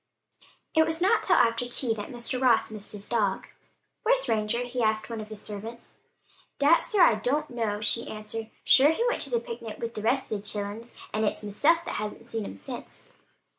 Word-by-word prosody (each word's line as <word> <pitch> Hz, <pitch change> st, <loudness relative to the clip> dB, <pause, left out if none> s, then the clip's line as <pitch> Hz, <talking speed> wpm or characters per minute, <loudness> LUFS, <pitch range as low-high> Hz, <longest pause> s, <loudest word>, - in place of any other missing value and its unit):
It 320 Hz, -, +5 dB
was 320 Hz, 0 st, -2 dB
not 390 Hz, +6 st, +4 dB
until 360 Hz, -, +2 dB
after 230 Hz, +1 st, +3 dB
tea 245 Hz, -1 st, +1 dB
that 205 Hz, -2 st, -6 dB
Mr. 245 Hz, +1 st, -2 dB
Ross 240 Hz, -4 st, +3 dB
missed 210 Hz, -1 st, -5 dB
his 205 Hz, -1 st, -2 dB
dog. 205 Hz, -5 st, 0 dB, 0.6 s
"Where's -, -, +3 dB
Ranger?" 220 Hz, +2 st, 0 dB
he 245 Hz, 0 st, -3 dB
asked 215 Hz, -1 st, +2 dB
of -, -, -10 dB
one 225 Hz, -1 st, -4 dB
of 215 Hz, -, -9 dB
the 215 Hz, -, -7 dB
servants. 215 Hz, +3 st, -7 dB, 0.6 s
"Dade, 290 Hz, +4 st, +5 dB
sir, 410 Hz, -6 st, +4 dB
I -, -, +7 dB
don't 265 Hz, +8 st, -1 dB
know," 220 Hz, -4 st, -2 dB
she 230 Hz, +2 st, +1 dB
answered. 220 Hz, +1 st, -5 dB
"Sure 275 Hz, +2 st, +6 dB
he 325 Hz, +9 st, +1 dB
went 485 Hz, -, 0 dB
to 280 Hz, -, 0 dB
the 240 Hz, -2 st, +1 dB
picnic 230 Hz, -1 st, -7 dB
wid 230 Hz, 0 st, -5 dB
the 210 Hz, -, -5 dB
rest 255 Hz, +5 st, 0 dB
of 210 Hz, -2 st, -2 dB
the -, -, -23 dB
childer, 205 Hz, +2 st, -3 dB, 0.3 s
an' 215 Hz, +1 st, 0 dB
it's 210 Hz, -, -2 dB
meself 295 Hz, +12 st, +2 dB
as -, -, -3 dB
hasn't 215 Hz, +2 st, -6 dB
seen 225 Hz, -2 st, -3 dB
him -, -, -7 dB
since." 100 Hz, -, -9 dB
230 Hz, 210 wpm, -27 LUFS, 215-260 Hz, 0.6 s, I